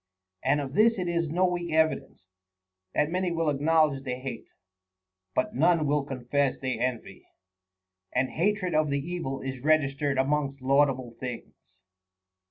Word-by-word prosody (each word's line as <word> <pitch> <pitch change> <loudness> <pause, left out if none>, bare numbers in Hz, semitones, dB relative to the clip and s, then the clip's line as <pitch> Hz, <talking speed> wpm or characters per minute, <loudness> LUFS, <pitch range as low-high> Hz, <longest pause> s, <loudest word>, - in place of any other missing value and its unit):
And 140 +3 +2
of 135 -2 -5
this 225 +5 +4
it 180 -2 -2
is 170 -2 0
no 180 +4 +2
weak 175 -1 -2
evidence, 160 -9 0 0.7
that 150 +2 +2
many 185 0 0
will 165 -2 +1
acknowledge 150 -1 +2
they 125 -2 -4
hate, 130 -3 -6 0.9
but 130 - 0
none 165 +3 +3
will 145 0 +1
confess 135 +1 -1
they 130 -1 -2
envy; 125 -2 -4 0.8
and 130 - +1
hatred 185 0 0
of 155 -1 +2
the 140 - +1
evil 140 -4 -4
is 135 -1 -5
registered 145 -2 +2
amongst 140 0 0
laudable 130 -2 +2
things. 125 -2 -6
145 Hz, 145 wpm, -27 LUFS, 135-165 Hz, 0.9 s, this